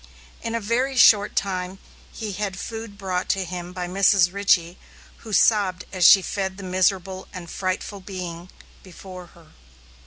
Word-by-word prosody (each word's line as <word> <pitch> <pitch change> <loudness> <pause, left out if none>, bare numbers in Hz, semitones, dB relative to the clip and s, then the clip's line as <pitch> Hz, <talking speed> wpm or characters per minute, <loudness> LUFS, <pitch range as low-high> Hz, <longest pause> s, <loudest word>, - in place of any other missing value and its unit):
In 230 0 -4
a - - 0
very 250 +5 -1
short 210 -4 +5
time 185 -1 -2 0.3
he 220 -3 -6
had 195 0 -4
food 225 -1 -7
brought 185 -2 -3
to 195 -1 0
him 175 0 -6
by 180 -1 -5
Mrs. 190 -1 +3
Richey, 185 -3 +1 0.4
who 220 - -11
sobbed 195 -4 +2
as 185 -3 +5
she 195 - +8
fed 190 -1 -3
the 200 - -9
miserable 185 0 -1
and 180 -4 -9
frightful 185 +2 -3
being 180 -2 -7 0.3
before 185 -1 -11
her. 170 -2 -20
190 Hz, 155 wpm, -23 LUFS, 180-200 Hz, 0.4 s, she